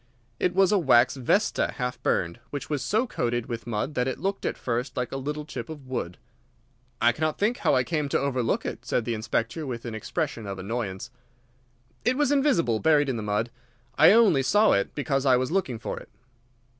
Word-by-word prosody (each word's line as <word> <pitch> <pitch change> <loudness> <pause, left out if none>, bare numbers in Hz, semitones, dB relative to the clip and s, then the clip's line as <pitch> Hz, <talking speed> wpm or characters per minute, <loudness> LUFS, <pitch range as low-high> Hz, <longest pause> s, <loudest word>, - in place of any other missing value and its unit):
It 180 - 0
was 195 0 +4
a 205 - +4
wax 130 -6 +4
vesta 140 - +1
half 125 -2 -4
burned, 85 0 0
which 145 +1 -6
was 145 -3 0
so 215 - +1
coated 120 - -2
with 115 -1 -6
mud 120 +6 -2
that 125 -2 0
it 130 - -2
looked 195 +1 -2
at - - -3
first 125 +1 -3
like 125 -1 -2
a - - -4
little 150 +3 -4
chip 125 -6 -7
of 150 -4 -9
wood. 125 -9 -4 0.8
"I 120 - +5
cannot 155 +4 -2
think 220 +4 +1
how - - +2
I 130 - +3
came 150 -1 -2
to - - +1
overlook 130 -4 0
it," - - -5
said 120 - -1
the 120 - -1
Inspector, 115 +6 -2
with 125 -4 -5
an 115 - -5
expression 115 -1 -3
of 100 -1 -5
annoyance. 100 +2 -4 0.9
"It 250 +3 +1
was 290 -2 +2
invisible, 265 - +2
buried 150 -1 +3
in 130 - -1
the - - -3
mud. 105 +3 -1 0.4
I - - +7
only 205 -10 +5
saw 205 +11 +4
it 100 - 0
because 135 -2 0
I 130 -3 +5
was 130 +3 -1
looking 170 -11 0
for 115 - -5
it." - - -15
130 Hz, 205 wpm, -26 LUFS, 120-160 Hz, 0.9 s, I